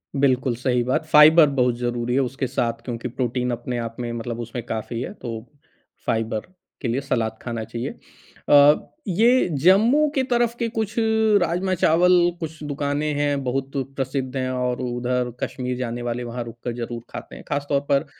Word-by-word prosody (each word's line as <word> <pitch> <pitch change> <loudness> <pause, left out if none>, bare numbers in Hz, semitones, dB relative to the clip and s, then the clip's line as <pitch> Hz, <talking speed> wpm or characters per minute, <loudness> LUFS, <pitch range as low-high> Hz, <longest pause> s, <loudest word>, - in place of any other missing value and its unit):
बिल्कुल 130 -3 +2
सही 125 0 0
बात। 130 +5 0
फाइबर 155 +1 +7
बहुत 125 -1 +3
ज़रूरी 120 0 -2
है 135 - +3
उसके 130 +1 -2
साथ 120 -2 -2
क्योंकि 120 -1 -4
प्रोटीन 125 0 -2
अपने 120 +1 -3
आप 115 -1 -4
में 120 -1 -3
मतलब 115 0 -4
उसमें 120 +1 -5
काफ़ी 115 0 -4
है 175 - -5
तो 115 - -7 0.6
फाइबर 110 -1 -1 0.3
के 130 - -2
लिए 120 +4 0
सलाद 115 -5 -1
खाना 115 -2 -4
चाहिए। 115 +2 -4 0.6
अ, 145 +1 +8 0.3
ये 230 +7 +4 0.2
जम्मू 225 - +5
के 265 - +2
तरफ 240 -2 +1
के 235 - 0
कुछ 220 -2 -3 0.5
राजमा-चावल, 180 0 +2 0.3
कुछ 160 -1 -6
दुकानें 145 +1 -1
हैं, 145 -1 0
बहुत 135 +1 -2 0.2
प्रसिद्ध 130 -1 -3
हैं 130 -1 -1
और 125 -1 -1
उधर 125 0 -1
कश्मीर 125 -1 -3
जाने 120 -1 -3
वाले 120 0 -3
वहाँ 120 0 -4
रुक 115 0 -11
कर 120 - -2
ज़रूर 120 0 -5
खाते - - -8
हैं। - - -11
ख़ासतौर 145 0 0
पर 140 -1 +3
125 Hz, 170 wpm, -23 LUFS, 120-150 Hz, 0.6 s, अ